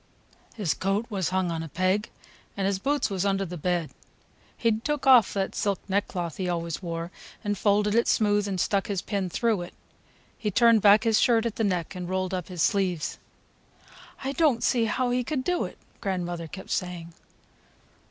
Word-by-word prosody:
His 200 -8 0
coat 195 +4 -1
was 190 -4 -1
hung 185 -1 0
on 165 -1 -2
a 160 - -6
peg, 185 +6 0 0.5
and 195 - 0
his 195 -1 0
boots 285 0 0
was 190 -2 -1
under 195 -1 +1
the 180 0 -6
bed. 175 -1 -1 0.7
He'd 225 -1 +1
took 295 0 -2
off 255 -6 +7
that 195 -1 -1
silk 200 -2 0
neckcloth 190 -4 -2
he 185 -2 -2
always 170 -1 -3
wore, 170 -1 -4 0.3
and 205 -1 0
folded 205 +1 +2
it 235 +1 +3
smooth 205 -1 +2
and 190 -2 -2
stuck 200 +4 +1
his 200 -4 -2
pin 195 -3 -2
through 220 +1 0
it. 175 - -8 0.6
He 215 - -1
turned 230 +1 +5
back 205 +1 +6
his 225 -2 +3
shirt 230 -2 +3
at 230 - -3
the 225 - 0
neck 180 -5 -1
and 180 -1 -6
rolled 185 0 -1
up 180 -2 -3
his 180 -3 -2
sleeves." 180 -5 0 1.0
"I 270 - -1
don't 285 -5 +2
see 235 -3 +2
how 245 +3 0
he 250 0 +1
could 265 0 -2
do 360 +3 0
it!" - - -9 0.2
grandmother 175 -3 -3
kept 190 +4 -9
saying. 175 -2 -3
195 Hz, 190 wpm, -26 LUFS, 180-220 Hz, 1.0 s, off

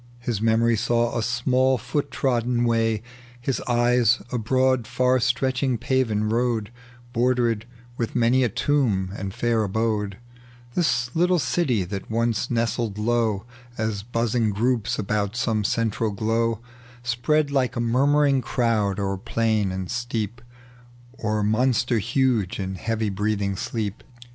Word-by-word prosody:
His 120 -4 -3
memory 115 +1 +3
saw 120 +1 +1
a 115 - 0
small 125 +3 +2
ibot 135 +5 -2
trodden 120 -2 0
way, 115 -2 +1 0.4
His 125 +2 -2
eyes 120 -1 +3
a 125 - -1
broad 130 +1 +1
far 125 +1 +2
stretching 130 0 +1
paven 125 -4 0
road 115 -1 0 0.4
Bordered 120 -2 +1 0.3
with 115 - -3
many 125 +2 +3
a 120 - +2
tomjj 105 -7 0
and 100 -1 -4
fair 115 +1 0
abode; 105 -1 -1 0.6
The 170 +1 +2 0.2
little 180 +2 +3
city 130 - +1
that 95 +2 -6
once 115 +1 0
nestled 115 -2 -1
low 110 -2 0 0.3
As 110 -2 -2
buzzing 115 0 0
groups 115 +2 0
about 105 +1 -1
some 115 -3 0
central 110 +1 0
glow, 115 +2 0 0.4
Spread 140 +5 +1
like 130 -3 +1
a - - -2
muimuiing 135 +3 +3
crowd 110 -5 0
o'er 100 -1 -1
plain 110 -2 0
and 95 -1 -4
steep. 120 -1 -3 0.7
Or 110 -3 -1
monster 120 +2 +2
huge 120 -4 0
in 95 -1 -3
heavj' 110 +2 -2
breathing 100 -1 -1
sleep. 105 0 -4
115 Hz, 135 wpm, -24 LUFS, 110-125 Hz, 0.7 s, memory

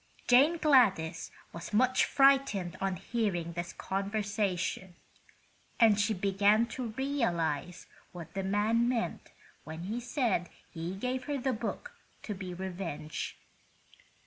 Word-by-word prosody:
Jane 280 +7 +6
Gladys 205 - +3 0.2
was 170 +4 -8
much 255 +4 +4
frightened 270 -10 +3
on 195 -1 0
hearing 180 -5 -2
this 175 0 -4
conversation, 195 -2 -2 0.8
and 220 -3 +6
she 215 +1 +1
began 200 +4 +3
to 250 0 -4
realize 180 - -1 0.3
what 170 -2 -9
the 195 - -2
man 210 +5 +2
meant 235 -2 -2 0.3
when 160 +1 -7
he 215 +6 -3
said 240 - 0 0.2
he 170 +2 -5
gave 250 +5 -3
her 290 -1 -2
the 265 0 0
book 245 - -4 0.3
to 210 - -4
be 185 -2 -6
revenged. 175 -4 -5
205 Hz, 120 wpm, -31 LUFS, 180-245 Hz, 0.8 s, Jane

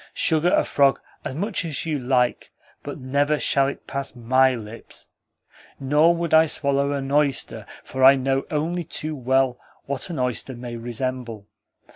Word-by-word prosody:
Sugar 165 +2 +2
a - - +3
frog 140 -1 +2 0.2
as 130 - -5
much 200 +4 -1
as 160 -3 -4
you 155 -3 -1
like, 125 -1 0 0.3
but - - -7
never 140 +3 0
shall 135 0 +2
it 140 - -6
pass 140 -1 -4
MY 130 +2 +3
lips. 110 0 -10 0.7
Nor 150 +5 +3
would 170 -1 -3
I 160 0 +6
swallow 140 -1 +1
an 135 -1 -4
oyster, 145 -2 0 0.2
for 130 0 -3
I 135 +1 +9
know 135 0 -1
only 165 +3 -1
too 155 -1 -4
well 130 -1 +1 0.3
what 140 +4 -3
an 170 - -5
oyster 125 0 -2
may 120 0 -7
resemble. 120 -2 -4
135 Hz, 160 wpm, -23 LUFS, 130-150 Hz, 0.7 s, I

